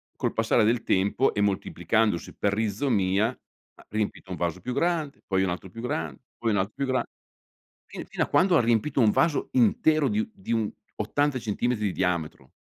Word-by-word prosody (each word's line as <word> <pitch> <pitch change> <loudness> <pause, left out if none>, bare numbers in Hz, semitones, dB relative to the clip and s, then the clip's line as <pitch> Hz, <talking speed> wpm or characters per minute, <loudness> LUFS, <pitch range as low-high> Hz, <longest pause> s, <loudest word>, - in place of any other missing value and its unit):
col - - -2
passare 115 0 +2
del 115 +2 +2
tempo, 100 +7 +2
e 105 - 0
moltiplicandosi 100 0 0
per 100 -1 0
rizomia, 105 -2 +1 0.5
ha - - -18
riempito 105 -3 -3
un 90 - -4
vaso 85 +1 -2
più 125 +7 -4
grande, 165 -4 -1
poi 95 -1 +1
un 95 - 0
altro 90 +2 -5
più 115 +5 -9
grande, 80 - -3 0.2
poi 115 -2 0
un 100 - +1
altro 95 +3 -1
più 140 - -1
grande, 130 -1 -1 0.8
fin - - -8
fino - - -1
a - - -2
quando 180 -2 +4
riempito 120 +4 +2
un 110 - +5
vaso 165 +3 +1
intero 145 +6 +3
di 210 - 0
un 225 +1 -2
di 190 -11 -7
un 110 -2 0 0.2
80 140 +5 0
centimetri 110 0 -1
di 95 - +1
diametro. 85 -8 -2
110 Hz, 190 wpm, -26 LUFS, 95-130 Hz, 0.8 s, un